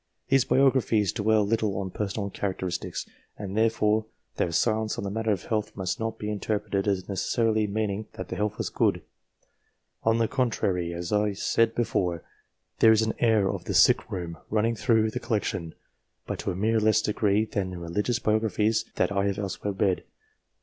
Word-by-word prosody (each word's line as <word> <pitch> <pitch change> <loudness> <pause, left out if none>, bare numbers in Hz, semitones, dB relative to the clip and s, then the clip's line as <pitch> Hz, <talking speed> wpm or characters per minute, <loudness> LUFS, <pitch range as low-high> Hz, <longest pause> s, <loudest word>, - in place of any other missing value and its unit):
These 135 -2 +4
biographies 125 -7 +3
dwell 110 0 +2
little 105 -2 0
on 95 -1 -3
personal 100 0 -3
characteristics, 95 -3 -3 0.3
and 100 -1 -6
therefore 110 -1 +2 0.3
their 85 - 0
silence 110 +4 +1
on - - -3
the 100 - -3
matter 110 +1 0
of 95 -4 -1
health 110 -1 -2
must 95 -2 -2
not 110 0 -3
be 105 -1 -4
interpreted 105 -1 -2
as 95 -2 +1
neces 100 0 -4 0.2
sarily 110 -2 +2
meaning 105 0 -2
that - - -7
the - - -3
health 105 -1 -1
was - - -2
good. - - +1 1.0
On 110 0 +2
the 115 -1 +2
contrary, 100 -10 0
as 85 0 -5
I 105 0 +2
said 115 +3 +1
before, 90 -7 0 0.6
there 110 - +7
is 110 0 +4
an 110 - 0
air 110 -4 +3
as - - 0
of - - -6
the - - -2
sick - - +5
room 85 -2 -5
running 110 +2 +1
through 110 -1 +2
the 125 - -3
collection, 95 -8 -2 0.5
but - - -4
to - - -2
a - - -4
much 110 +3 +1
less 110 0 +3
degree 105 0 +1
than 100 -3 -3
in 90 - -6
religious 105 +8 -1
biographies 110 -1 +1
that 90 - +1
I 100 0 +1
have 100 -1 -1
elsewhere 100 0 -3
read. 95 -1 +1
105 Hz, 185 wpm, -27 LUFS, 100-110 Hz, 1.0 s, there